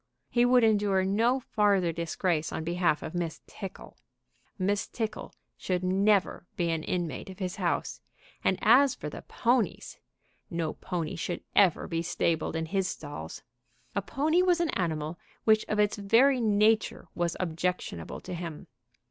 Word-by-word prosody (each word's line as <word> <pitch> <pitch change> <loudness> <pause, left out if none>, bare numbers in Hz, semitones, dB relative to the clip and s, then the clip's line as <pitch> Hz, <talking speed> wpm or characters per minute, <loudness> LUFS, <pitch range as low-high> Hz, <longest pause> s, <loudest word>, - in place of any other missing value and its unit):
He 240 0 +4
would 245 -1 +5
endure 205 -3 +3
no 230 +7 +2
farther 205 -7 +2
disgrace 170 0 -1
on 160 - -3
behalf 170 -2 +1
of - - -6
Miss 170 -2 -3
Tickle. 195 -2 -9 0.6
Miss 200 +1 0
Tickle 220 -2 -4 0.3
should 180 -1 -2
never 195 0 +2
be 170 -1 0
an 165 -1 -1
inmate 170 -2 -3
of 190 - -9
his 185 -2 -4
house, 180 -3 -1 0.4
and 190 - +2
as 255 +4 +6
for 150 - -6
the - - -8
ponies, 235 -6 -1 0.5
no 165 -2 -2
pony 170 -4 -4
should 175 +1 -4
ever 190 -5 +4
be 165 -1 -1
stabled 165 -1 -1
in 160 0 -1
his 190 +3 0
stalls. 145 - -7 0.5
A 200 - +1
pony 305 - +1
was 360 -1 +3
an 340 -2 +1
animal 160 -2 -2 0.2
which 215 -1 +4
of 215 - -1
its 210 0 +2
very 240 +6 +4
nature 215 -2 +2
was 170 -1 -1
objectionable 170 - -3
to 185 - -7
him. 170 -3 -6
185 Hz, 155 wpm, -29 LUFS, 170-215 Hz, 0.6 s, as